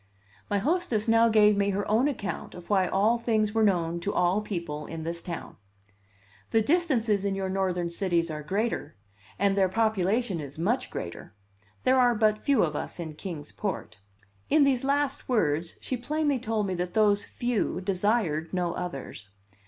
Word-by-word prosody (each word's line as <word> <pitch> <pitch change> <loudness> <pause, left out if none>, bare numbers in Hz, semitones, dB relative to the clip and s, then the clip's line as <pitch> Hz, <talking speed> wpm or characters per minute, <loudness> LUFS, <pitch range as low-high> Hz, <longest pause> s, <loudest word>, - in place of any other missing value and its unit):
My 205 - +1
hostess 245 - 0
now 230 0 +5
gave 210 -1 +5
me 200 0 +1
her 200 +1 -1
own 225 +6 +3
account 230 -9 -4
of 180 +2 -10
why 190 -2 +3
all 215 +6 +2
things 220 -3 +1
were 225 - +2
known 170 -5 +2
to 200 +4 -2
all 180 +3 +2
people 170 -7 -5
in 165 -1 -6
this 170 +1 -4
town. 170 -2 -7 0.9
"The 225 - +3
distances 235 - +1
in 200 -1 0
your 190 -1 -2
Northern 185 -3 -1
cities 170 -2 0
are 150 0 -5
greater, 205 +9 -2 0.4
and 200 -1 +2
their 190 -2 +3
population 215 -1 +1
is 140 0 -9
much 235 +10 0
greater. 85 +4 -7 0.5
There 260 0 +4
are 245 -1 +4
but 215 -1 +2
few 280 +3 +3
of 155 -3 -1
us - - -4
in 160 -2 -5
Kings 155 -3 -7
Port." 165 - -5 0.5
In 305 -1 +5
these 270 -3 +2
last 280 0 0
words 165 - 0
she 255 - -2
plainly 290 +2 0
told 220 -3 -1
me 190 - -2
that 180 0 -3
those 210 -2 +3
"few" 240 -6 -1
desired 185 -4 0
no 180 -2 -1
others. 135 - -6
200 Hz, 175 wpm, -27 LUFS, 175-230 Hz, 0.9 s, now